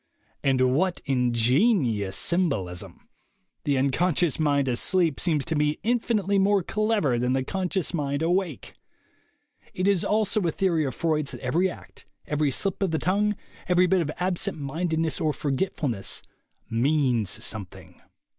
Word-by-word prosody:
And 130 -2 +3
what 180 +5 +1
ingenious 125 - +2
symbolism! 125 - -1 0.6
The 140 -2 +1
unconscious 155 +4 +1
mind 145 -3 +2
asleep 160 +5 +2
seems 155 -6 +1
to 165 - -2
me 150 0 +1
infinitely 215 -4 +1
more 195 -1 +3
clever 210 - 0
than 125 +1 +1
the 130 0 0
conscious 185 +2 -2
mind 145 -2 -1
awake! 175 - -1 1.0
It 185 +1 0
is 200 -4 +3
also 215 0 +1
a 170 -3 0
theory 170 -3 +1
of 130 - -4
Freud's 155 -3 -1
that - - -8
every 165 +9 +1
act, - - -13 0.2
every 150 -1 0
slip 195 +9 -3
of 195 - +2
the 160 - 0
tongue, 205 +5 +1 0.3
every 180 0 +4
bit 185 0 +2
of 155 - -2
absent 180 -1 -1
mindedness 160 +2 -1
or 155 -2 +1
forgetfulness, 135 - -2 0.4
means 125 -3 +1 0.2
something. 100 -4 -5
160 Hz, 140 wpm, -25 LUFS, 135-185 Hz, 1.0 s, every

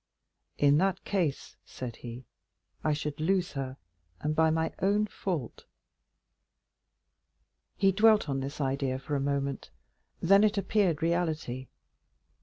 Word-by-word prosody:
"In 145 +1 +5
that 190 0 +1
case," 175 -8 -1
said 125 -3 -7
he, 120 +1 -8 0.6
"I 155 - +2
should 150 0 -3
lose 180 +3 +1
her, 135 -1 -5 0.4
and 150 +1 -1
by 160 0 +4
my 160 0 0
own 205 +2 +3
fault." 180 - -4 2.1
He 195 -1 +4
dwelt 215 +1 +4
on 135 -1 -1
this 135 +3 -5
idea 135 -1 0
for 145 +2 -4
a - - +1
moment, 140 0 -2 0.5
then 195 +4 +5
it 215 0 +3
appeared 190 -5 +1
reality. 155 -7 -1
155 Hz, 125 wpm, -29 LUFS, 135-190 Hz, 2.1 s, In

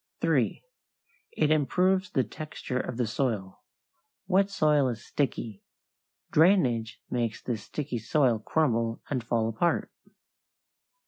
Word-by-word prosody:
3. - - +1 0.7
It 155 -1 +2
improves 180 +6 +2
the 130 - +1
texture 130 +1 -5
of 125 - -4
the 125 - +1
soil. 110 -5 -2 0.7
Wet 195 +1 +3
soil 150 -7 +3
is 115 -3 -4
sticky. 115 -7 -2 0.7
Drainage 130 - +3
makes 120 -1 -1
this 115 -4 -4
sticky 125 0 -4
soil 120 0 +2
crumble 115 -4 0
and 130 -4 -1
fall 115 -1 0
apart. 115 +10 0
125 Hz, 115 wpm, -28 LUFS, 115-155 Hz, 0.7 s, Wet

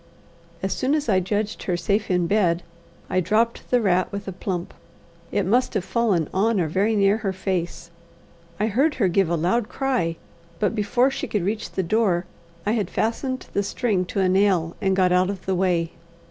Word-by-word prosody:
As 190 0 0
soon 270 +7 +1
as 300 -3 -1
I 195 -4 +4
judged 205 +3 -2
her 180 -2 -1
safe 200 +4 0
in 180 -2 +2
bed, 175 -3 +2 0.4
I 185 - +1
dropped 215 +6 0
the 250 - +4
rat 185 -4 +1
with 200 0 -6
a - - -2
plump. 180 -1 -4 0.6
It - - 0
must 245 +5 +2
have 195 -3 0
fallen 195 -7 +1
on 210 +2 +2
or 170 - +1
very 200 +7 +1
near 200 0 +4
her 210 -3 -2
face. 180 -3 -3 0.7
I 210 - +2
heard 265 +9 +2
her 200 - +2
give 180 0 +2
a 170 - +1
loud 195 +8 0
cry, 250 -12 0 0.4
but 210 - +1
before 240 +5 +2
she 275 - -4
could 205 -5 -1
reach 215 +2 -2
the 190 - 0
door, 185 -2 +1 0.4
I 210 - +1
had 215 -5 0
fastened 255 +3 -2
the 200 - +2
string 200 -2 0
to 195 +2 -2
a 190 - +3
nail 185 -3 +2
and 190 -1 +2
got 185 -1 +3
out 180 +1 +3
of 200 -2 -5
the 190 - 0
way. 175 -3 +1
195 Hz, 200 wpm, -23 LUFS, 180-220 Hz, 0.7 s, I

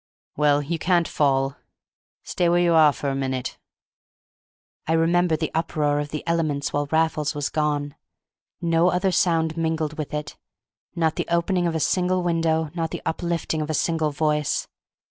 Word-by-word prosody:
Well, 145 0 +3
you 165 +3 -3
can't 175 -1 +2
fall; 135 -1 +1 0.7
stay 175 -1 0
where 175 - +3
you 175 -1 +3
are 155 -2 +6
a 140 -1 0
minute." 130 -2 -3 1.3
I 160 - +1
remember 165 0 +2
the 160 0 -3
uproar 150 -3 0
of 145 0 -3
the 150 - -5
elements 155 -4 -1
while 145 0 0
Raffles 160 -2 +1
was 145 -1 -2
gone; 145 -2 -1 0.7
no 170 +1 +2
other 180 +2 +1
sound 165 -3 +1
mingled 160 -2 -1
with 150 - -4
it; 150 0 -5 0.6
not 160 -2 0
the - - -2
opening 175 +1 +1
of 165 - -2
a - - 0
single 180 +2 +1
window, 165 -2 0
not 165 -2 -2
the - - -6
uplifting 165 -1 -2
of 150 - -4
a 155 - 0
single 160 -1 +1
voice. 150 0 0
160 Hz, 165 wpm, -24 LUFS, 150-170 Hz, 1.3 s, are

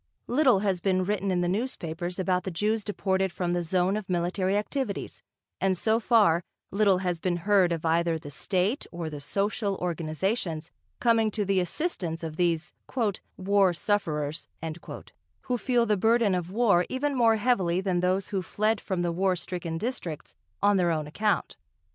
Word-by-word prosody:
Little 255 -6 +3
has 195 -4 0
been 185 -1 +2
written 200 0 -1
in 180 -1 +1
the 175 - +1
newspapers 180 -5 -3
about 185 -1 0
the - - -3
Jews 210 +5 0
deported 190 -2 0
from 175 0 -2
the 175 - 0
zone 180 +3 +1
of 210 -3 -5
military 185 +2 0
activities, 215 +1 -3 0.4
and 190 -1 +1
so 220 +4 +2
far 210 -8 +4 0.3
little 200 -1 +3
has 175 -2 0
been 175 0 0
heard 195 -4 +4
of 165 -1 -2
either 165 0 +2
the 145 -2 -9
state 190 - 0
or 170 -2 -5
the 150 - -6
social 200 +5 -1
organisations 170 0 -2 0.3
coming 230 -2 +3
to 210 0 -2
the 195 -1 +2
assistance 180 - -2
of 160 -1 -5
these 175 -1 0 0.6
"war 195 -1 +3
sufferers," 155 -6 -1 0.9
who 250 - -1
feel 240 +1 +2
the 210 -2 +2
burden 225 0 +3
of 180 -1 -2
war 200 -4 +3
even 280 +2 -1
more 230 -3 +4
heavily 200 -6 +1
than 190 -2 0
those 185 +2 0
who 195 -2 -1
fled 215 +4 0
from 185 -2 -2
the 175 - 0
war 185 +2 +1
stricken 175 -1 -4
districts 175 - -5 0.3
on 205 0 +5
their 175 -2 +2
own 155 -2 0
account. 205 +8 -1
190 Hz, 170 wpm, -27 LUFS, 175-210 Hz, 0.9 s, on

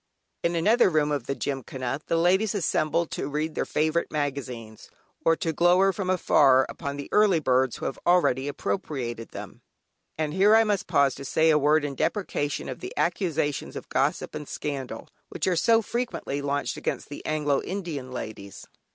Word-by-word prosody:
In 170 0 0
another 215 +7 +4
room 150 -3 +1
of 140 -5 -2
the 140 - -1
Gymkhana 135 0 -4
the 165 - +1
ladies 190 +5 +2
assemble 170 -2 +1
to 145 - -4
read 155 +2 -2
their - - -2
favourite 155 +2 0
magazines, 130 -7 -4 0.3
or 165 - +4
to 165 -2 -2
glower 180 +4 +4
from 190 -2 -3
afar 135 -7 +4
upon 140 -3 -5
the 140 - -6
early 210 -5 +4
birds 130 -3 +2
who - - -6
have - - -3
already 145 -7 +3
appropriated 120 -2 -3
them. - - -9 0.6
And 155 -1 -2
here 200 +4 +5
I 225 - +6
must 205 -3 -1
pause 140 -2 +3
to - - -9
say 160 +3 +3
a 150 - +4
word 150 +1 +3
in 145 - -3
deprecation 145 -2 -2
of - - -6
the 375 +6 -8
accusations 155 -6 -1
of - - -8
gossip - - 0
and 150 -2 -6
scandal, 140 -3 -5 0.2
which - - -3
are 185 - +2
so 225 +6 +4
frequently 235 - -3
launched 140 0 -2
against - - -3
the 145 - -8
Anglo 150 -2 0
Indian 165 -9 -5
ladies. 110 -5 -7
150 Hz, 175 wpm, -26 LUFS, 140-175 Hz, 0.6 s, I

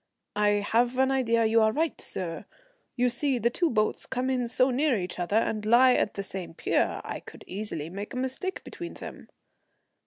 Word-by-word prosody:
"I 205 -1 +2
have 240 +2 +2
an 265 0 +3
idea 230 -4 +2
you 225 +1 +4
are 220 0 +4
right, 315 +6 -1
sir. 170 -3 -5 0.5
You 250 0 +2
see 255 +2 0
the 235 +1 +1
two 345 +5 +1
boats 215 -5 0
come 260 0 -1
in 250 -2 0
so 255 +2 +2
near 270 -1 +2
each 180 -1 -4
other 175 +4 -1
and 215 -1 0
lie 245 +4 +6
at 210 - 0
the 200 - -3
same 190 -4 -7
pier. - - 0
I - - -5
could - - -13
easily 185 -6 -5
make 200 +7 -6
a - - -3
mistake 260 +9 -3
between 345 -1 -7
them." - - -9
235 Hz, 195 wpm, -28 LUFS, 210-260 Hz, 0.5 s, lie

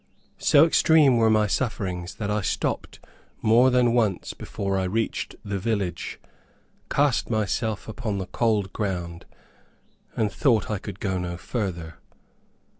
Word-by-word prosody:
So 145 +2 +6
extreme 155 -5 +5
were 115 -1 +4
my 110 -1 +4
sufferings, 95 -6 -2
that 105 -1 -3
I 105 0 0
stopped 90 - -2 0.4
more 120 +3 +5
than 125 -2 +3
once 110 -7 0
before 100 -1 -4
I 95 - 0
reached 110 +5 -2
the 100 -1 -2
village, 95 -5 -2 0.7
cast 140 -3 +1
myself 110 0 -1
upon 110 -2 -3
the 95 - -3
cold 105 -2 0
ground, 90 -5 -4 0.9
and 105 -2 +1
thought 115 -1 +1
I 105 - -1
could 100 -1 -8
go 95 -2 -1
no 90 -1 -4
further. 90 -7 -4
105 Hz, 135 wpm, -25 LUFS, 95-115 Hz, 0.9 s, So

